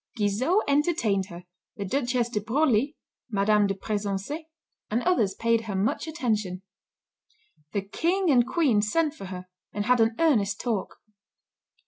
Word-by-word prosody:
Guizot 235 Hz, -, +2 dB
entertained 280 Hz, -, +1 dB
her, 175 Hz, -1 st, -10 dB, 0.3 s
the 200 Hz, -, -4 dB
Duchess 245 Hz, +1 st, 0 dB
de 210 Hz, -3 st, -2 dB
Broglie, 265 Hz, +3 st, +1 dB, 0.4 s
M. 210 Hz, 0 st, +3 dB
de 195 Hz, -, -1 dB
Pressensé, 205 Hz, -, -3 dB, 0.4 s
and 230 Hz, +3 st, 0 dB
others 285 Hz, -, +2 dB
paid 230 Hz, 0 st, +1 dB
her 205 Hz, -3 st, -4 dB
much 200 Hz, +10 st, 0 dB
attention. 215 Hz, -, -2 dB, 1.1 s
The 200 Hz, -, -1 dB
King 345 Hz, -, +1 dB
and 245 Hz, -2 st, +4 dB
Queen 275 Hz, -12 st, +2 dB
sent 295 Hz, +9 st, +1 dB
for 200 Hz, -, -9 dB
her, 185 Hz, -1 st, -7 dB, 0.3 s
and 205 Hz, 0 st, -3 dB
had 250 Hz, 0 st, +4 dB
an 225 Hz, 0 st, +2 dB
earnest 215 Hz, -12 st, +2 dB
talk. 225 Hz, -6 st, -2 dB
225 Hz, 140 wpm, -26 LUFS, 200-285 Hz, 1.1 s, and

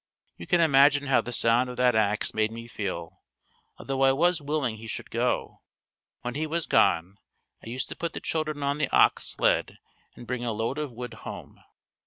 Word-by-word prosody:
You 85 Hz, -, -10 dB
can 175 Hz, -, +3 dB
imagine 145 Hz, -1 st, +5 dB
how 135 Hz, -, +4 dB
the 120 Hz, -, -7 dB
sound 120 Hz, +1 st, +2 dB
of 125 Hz, -, -7 dB
that 125 Hz, -1 st, +4 dB
ax 105 Hz, -1 st, +1 dB
made 110 Hz, 0 st, +1 dB
me 115 Hz, +1 st, -8 dB
feel, 95 Hz, -7 st, -5 dB, 0.6 s
although 135 Hz, 0 st, -3 dB
I 135 Hz, 0 st, +5 dB
was 170 Hz, +3 st, +2 dB
willing 145 Hz, -6 st, -1 dB
he 110 Hz, +1 st, -10 dB
should -, -, -6 dB
go. -, -, -1 dB, 0.6 s
When 125 Hz, 0 st, -3 dB
he 155 Hz, +4 st, -2 dB
was 165 Hz, +1 st, -1 dB
gone, 90 Hz, +2 st, +2 dB, 0.4 s
I -, -, -8 dB
used 125 Hz, +2 st, -3 dB
to -, -, -6 dB
put 170 Hz, -1 st, -4 dB
the -, -, -4 dB
children 155 Hz, -2 st, -2 dB
on 140 Hz, +1 st, 0 dB
the 150 Hz, -, 0 dB
ox -, -, +4 dB
sled -, -, 0 dB, 0.4 s
and -, -, -11 dB
bring 125 Hz, 0 st, -3 dB
a 115 Hz, -2 st, -1 dB
load 115 Hz, +7 st, -2 dB
of 150 Hz, -3 st, -3 dB
wood 120 Hz, 0 st, -7 dB
home. -, -, -9 dB
125 Hz, 200 wpm, -27 LUFS, 115-145 Hz, 0.6 s, imagine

